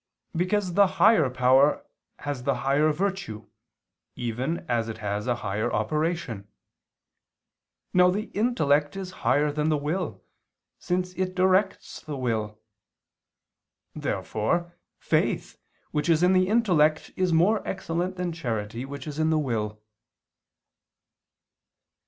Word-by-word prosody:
Because 185 +2 0
the 200 +2 +5
higher 175 - +5
power 130 +3 +3 0.3
has 145 -3 -4
the 135 +1 0
higher 145 +3 +3
virtue 190 - -3 0.7
even 125 +7 -3
as 115 -2 0
it 110 - -5
has 105 +1 -3
a 120 - +2
higher 110 +5 -1
operation. 150 - -2 1.5
Now 180 0 +6
the 205 +4 -2
intellect 155 - +1
is 190 -2 -5
higher 145 +3 +2
than 150 +1 0
the 155 - +2
will, 150 - -3 0.6
since 180 0 -2
it 185 0 -2
directs 190 +1 +1
the 150 -2 -6
will. 110 -4 -2 1.4
Therefore, 170 +11 -2 0.2
faith, - - -1 0.3
which 150 +3 -1
is 165 +1 +4
in 180 +1 +5
the 185 0 +3
intellect, 175 -9 +2
is 185 -2 +1
more 180 +7 +3
excellent 185 -1 -3
than 180 -2 -3
charity 115 -5 -4
which 140 +1 -8
is 150 0 -6
in 160 0 +2
the 160 - +2
will. 110 -7 -2
155 Hz, 120 wpm, -26 LUFS, 125-180 Hz, 1.5 s, Now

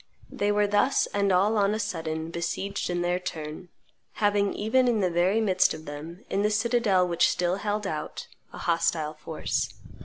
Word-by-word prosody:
They 205 0 0
were 205 0 +3
thus 205 +6 +2
and 200 -1 +2
all 200 +4 +3
on 200 +1 +2
a - - -3
sudden 160 -6 -3
besieged 175 +4 -3
in 175 0 -1
their 175 +1 0
turn, 160 0 -6 0.4
having 205 -1 +2
even 250 +5 +2
in 235 -3 +2
the 185 -3 +1
very 180 +5 +2
midst 190 -6 +3
of 155 0 -11
them, 160 +8 -8
in 195 - 0
the 210 - +2
citadel 215 -4 +2
which 170 -1 +3
still 180 +1 0
held 210 0 -2
out, 155 -5 -4 0.3
a - - -10
hostile 165 -2 0
force. 155 +1 -3
190 Hz, 180 wpm, -27 LUFS, 170-210 Hz, 0.4 s, were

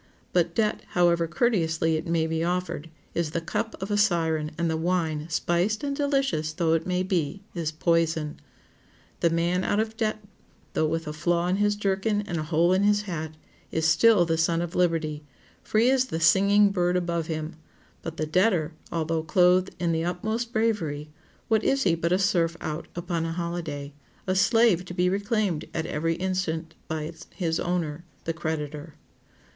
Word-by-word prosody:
But 170 -1 +2
debt, 215 -2 +1 0.2
however 170 -1 +4
courteously 165 -6 +1
it 155 +2 -3
may 165 -1 +1
be 160 0 -1
offered, 175 -2 -2 0.2
is 170 -2 -1
the 165 - -2
cup 225 +7 -3
of 190 +2 -4
a 205 - +2
siren, 165 -6 +2
and 170 +1 0
the 160 - 0
wine, 160 -2 -1
spiced 175 - 0
and 280 -1 -1
delicious 275 - 0
though 160 0 +1
it 165 +1 0 0.2
be, 180 +1 -1
is 165 -3 -2
poison. 160 -1 0 0.8
The 170 - +3
man 170 +2 +1
out 205 - +1
of 220 0 -1
debt, 215 -1 -1 0.5
though 155 - +2
with 165 0 -2
a 150 - -3
flaw 170 +3 0
in 185 - +1
his 205 0 +2
jerkin 205 +1 0
and 170 -4 -3
a - - -2
hole 170 +3 +3
in 190 - +3
his 205 0 +3
hat, 160 -5 -5 0.4
is 160 0 +1
still 200 +2 +5
the 165 -1 0
son 165 +1 +2
of 175 - -5
liberty, 160 -4 0 0.4
free 230 +4 +3
as 260 -1 +3
the 160 -10 -3
singing 200 +5 +5
bird 180 -2 +1
above 170 -2 -1
him; 155 0 -4 0.5
but 165 0 -6
the 155 - -1
debtor, 170 -1 +2 0.2
although 165 -1 -1
clothed 180 +3 +3
in 170 -1 +1
the 165 0 0
utmost 220 +7 -2
bravery, 165 -11 -1 0.4
what 220 -1 +2
is 270 0 +2
he 175 - +3
but 170 +1 -1
a 180 - +4
serf 170 -4 +1
out 155 +1 -4
upon 175 -1 -2
a 165 0 -2
holiday? 165 -5 -4 0.3
a 185 - +1
slave 200 -1 +4
to 180 - -8
be 180 0 +2
reclaimed 200 -3 0
at 160 -1 -1
every 165 +2 -1
instant 175 -3 -2
by 155 0 -3 0.2
his 165 -3 -1
owner, 170 -3 -2 0.2
the 165 - -2
creditor? 155 -1 -4
170 Hz, 180 wpm, -26 LUFS, 160-195 Hz, 0.8 s, still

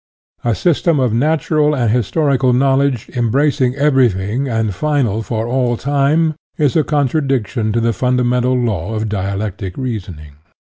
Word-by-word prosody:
A 120 -2 +1
system 170 -2 +1
of 125 -4 +1
natural 150 +3 +1
and 120 -5 +1
historical 130 - +1
knowledge, 135 -1 +1
embracing 130 +2 +1
everything, 130 -4 +1
and 110 -4 -1
final 130 -4 0
for 110 +1 -3
all 125 -1 0
time, 145 +4 +1 0.2
is 145 -4 +1
a 160 - +3
contradiction 135 -7 0
to 115 - 0
the 115 0 +1
funda 125 +4 0
mental 125 +1 +1
law 110 -4 -2
of 110 0 -2
dialectic 100 -1 -4
reasoning. 90 - -6
125 Hz, 140 wpm, -17 LUFS, 110-140 Hz, 0.2 s, a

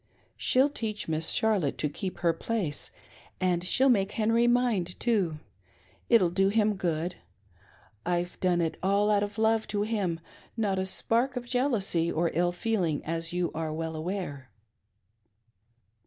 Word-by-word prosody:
She'll 265 +3 +3
teach 220 -6 -4
Miss 160 0 0
Charlotte 205 -10 +1
to 150 - 0
keep 185 +6 -5
her 170 -1 +3
place, 170 -5 -3 0.5
and 180 -2 +1
she'll 260 +8 +3
make 205 -6 +2
Henry 230 +2 +2
mind 235 -8 +1
too. 195 -10 +1 0.7
It'll 205 -8 +5
do 195 +2 +3
him 215 0 +2
good; 175 -1 -2 0.5
—: 100 - -29
I've 175 0 -2
done 180 -2 +2
it 165 -1 -1
all 200 +2 +2
out 205 -1 +3
of 205 +1 -4
love 220 0 +2
to 205 -1 -1
him, 200 -7 -1 0.4
not 200 -4 0
a 190 - -1
spark 240 +7 0
of 245 -1 -4
jealousy 230 -10 0
or 165 +1 0
ill 175 +1 +2
feeling, 180 -5 -1
as 165 +1 -3
you 175 0 -1
are 160 -1 -3
well 160 +1 -4
aware." 155 -6 -4
190 Hz, 155 wpm, -28 LUFS, 170-220 Hz, 0.7 s, It'll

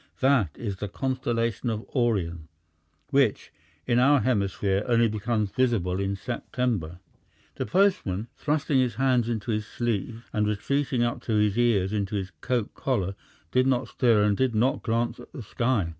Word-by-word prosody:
That 130 - +3
is 100 -5 -4
the 105 - -4
constellation 120 0 -1
of 110 0 -4
Orion, 90 - 0 0.6
which, 135 -6 +1 0.3
in 120 - +2
our 140 +1 +5
hemisphere, 100 -3 0
only 115 -1 +4
becomes 110 -1 -1
visible 105 -8 +1
in 100 0 -1
September." 110 -5 -3 0.6
The - - -4
postman, 175 - +1
thrusting 145 -2 +1
his 125 -4 +1
hands 125 -2 +2
into 115 -1 -2
his 105 -1 -2
sleeves 115 0 -3
and 105 0 +1
retreating 130 +4 0
up 120 0 -1
to 115 - -1
his 105 -1 +2
ears 110 -5 +2
into 105 0 -1
his 95 -2 -3
coat 120 -4 -1
collar, 100 -8 -1 0.4
did 130 +1 +3
not 125 -2 +1
stir 115 -5 +3
and 105 -1 +3
did 130 0 0
not 120 +5 +2
glance 115 +1 -1
at - - -13
the 135 -8 -7
sky. 115 -4 0
115 Hz, 160 wpm, -26 LUFS, 100-125 Hz, 0.6 s, our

